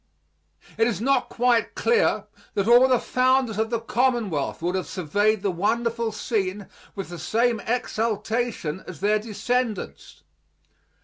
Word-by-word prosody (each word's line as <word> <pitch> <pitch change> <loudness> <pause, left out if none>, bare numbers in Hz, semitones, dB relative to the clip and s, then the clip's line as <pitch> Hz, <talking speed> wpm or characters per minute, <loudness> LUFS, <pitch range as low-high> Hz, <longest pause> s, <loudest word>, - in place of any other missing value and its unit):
It 225 - +4
is 235 - -1
not 255 +1 +1
quite 240 -1 +1
clear 470 0 +2 0.3
that 200 0 0
all 245 +2 +7
the 255 -1 +4
founders 255 -3 +1
of 220 0 0
the 235 -1 -1
Commonwealth 235 - 0
would 175 +1 0
have 185 -1 -2
surveyed 205 +4 0
the 200 - +1
wonderful 230 +5 0
scene 205 -3 -2 0.3
with 195 -3 -5
the 175 -1 -7
same 230 +6 +1
exultation 220 -6 -2
as 170 -5 -8
their 210 +1 +2
descendants. 230 +1 -3
225 Hz, 135 wpm, -24 LUFS, 200-245 Hz, 0.3 s, all